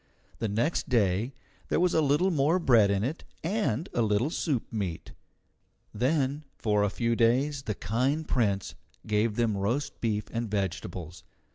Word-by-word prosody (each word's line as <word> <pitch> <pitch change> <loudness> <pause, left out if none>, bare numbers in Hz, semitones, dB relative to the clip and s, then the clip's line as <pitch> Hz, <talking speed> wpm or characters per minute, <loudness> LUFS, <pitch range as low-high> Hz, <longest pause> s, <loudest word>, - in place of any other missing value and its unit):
The 115 - 0
next 120 +10 0
day 115 +1 +1 0.3
there - - +2
was 180 0 +3
a 160 - +4
little 150 +6 +3
more 155 +2 +3
bread 120 - +5
in 100 0 +1
it 140 +8 -3 0.2
and 165 - 0
a 120 - +1
little 110 +6 +1
soup 145 -9 -1
meat. 95 -7 -3 0.8
Then 135 +4 0
for 105 -2 +1
a 105 - +2
few 115 +3 0
days 130 +5 +2
the 110 -6 -3
kind 130 - 0
Prince 100 -6 0 0.3
gave 105 0 +1
them 115 -3 +1
roast 115 +9 -2
beef 105 -2 0
and 115 -1 -2
vegetables. 90 -3 -4
115 Hz, 155 wpm, -28 LUFS, 105-145 Hz, 0.8 s, bread